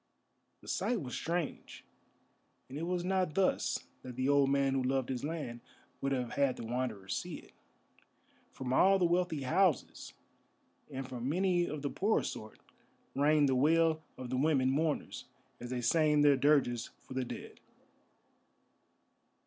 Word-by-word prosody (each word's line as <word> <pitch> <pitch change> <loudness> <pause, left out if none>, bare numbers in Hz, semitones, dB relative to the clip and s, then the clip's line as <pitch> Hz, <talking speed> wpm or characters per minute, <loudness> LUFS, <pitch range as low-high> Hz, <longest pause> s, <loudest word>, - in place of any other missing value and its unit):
The - - -16
sight 240 -3 0
was 130 -7 -6
strange, 170 -2 -4 0.8
and 130 - -10
it 165 +3 -3
was 180 -1 -1
not 185 -4 0
thus 195 -1 +1 0.2
that 125 -1 -9
the 130 +2 0
old 140 -1 +4
man, 140 -1 +2
who 135 - +1
loved 130 0 0
his 130 -1 -3
land, 145 -6 -4 0.4
would 135 - -1
have 125 -3 -1
had 140 -3 +1
the 115 - -7
Wanderer 115 -5 -3
see - - -3
it. - - -13 1.0
From 130 -1 -4
all 195 +8 +5
the 180 - +2
wealthy 175 -4 0
houses, 175 +3 +1 0.8
and 135 -2 -5
from 125 0 -4
many 180 +1 +2
of 150 -1 -5
the 140 - -2
poorer 210 +3 +1
sort, 110 0 -7 0.6
rang 150 +1 +4
the 135 - +2
wail 160 +4 +3 0.2
of 130 -1 -7
the 130 - 0
women 135 -2 +2
mourners 155 +2 -1 0.3
as 120 - -7
they 125 -1 -2
sang 150 +2 +3
their 145 -1 +6
dirges 130 -4 +2
for - - -10
the 130 0 -1
dead. 125 - -8
140 Hz, 155 wpm, -32 LUFS, 130-165 Hz, 1.0 s, their